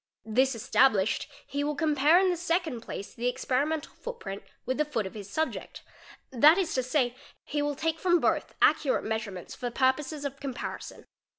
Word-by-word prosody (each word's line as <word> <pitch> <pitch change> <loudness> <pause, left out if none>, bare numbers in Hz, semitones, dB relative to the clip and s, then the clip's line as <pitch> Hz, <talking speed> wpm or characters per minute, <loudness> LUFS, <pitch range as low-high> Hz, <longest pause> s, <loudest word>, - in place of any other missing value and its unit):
This 255 +4 +2
established, 220 -2 +2 0.2
he 285 +1 -2
will 295 0 -1
compare 300 +1 +4
in 375 -1 +3
the - - 0
second 335 -7 -1
place 200 - -7
the 240 +1 -2
experimental 290 +5 -1
footprint 470 - -7 0.2
with 260 +2 -2
the - - +5
foot 230 -8 -2
of 190 - -6
his 205 -2 -8
subject, 315 +9 -3 0.5
that 295 +7 +7
is 370 -4 0
to 260 - +1
say, 250 -1 0 0.3
he 295 0 -2
will 290 0 -1
take 325 +2 -1
from 350 -1 +3
both - - 0
accurate 275 -4 +3
measurements 215 -5 -4
for 245 - -4
purposes 275 +4 0
of 275 0 -4
comparison. 270 -3 -6
275 Hz, 175 wpm, -28 LUFS, 245-315 Hz, 0.5 s, that